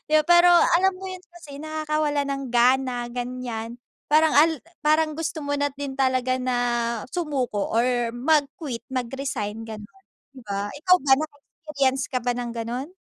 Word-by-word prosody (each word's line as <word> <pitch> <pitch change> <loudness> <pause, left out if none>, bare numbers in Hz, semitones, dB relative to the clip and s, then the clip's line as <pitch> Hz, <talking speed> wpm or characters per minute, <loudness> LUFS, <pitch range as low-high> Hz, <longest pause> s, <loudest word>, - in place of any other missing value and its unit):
Yo 310 0 +5
pero, 345 0 +6
alam 360 +2 +4
mo 380 +1 -9
yun, 370 - -6 0.2
kasi 290 -5 -11
nakakawalan 305 -2 -1
ng 275 0 -3
gana, 250 0 +3
ganiyan. 245 -1 -5 0.3
Parang 310 0 +4
al 315 -1 +4 0.3
parang 310 0 +3
gusto 320 0 -3
mo 285 0 -1
na 285 - +1
din 280 -1 -6
talaga 255 -1 +1
na 255 -1 -1 0.5
sumuko 270 - -2
or 240 0 +1
mag-quit, 285 -1 0
mag-resign, 245 -4 -4
gano'n, 220 - -10 0.3
di 270 - -14
ba? 200 0 -3
Ikaw 365 +5 +3
ba, 270 -1 +3
naka-experience 290 -3 -2
ka 255 - -2
ba 245 - 0
ng 240 -1 -4
gano'n? 245 +9 -5
275 Hz, 150 wpm, -24 LUFS, 245-310 Hz, 0.5 s, pero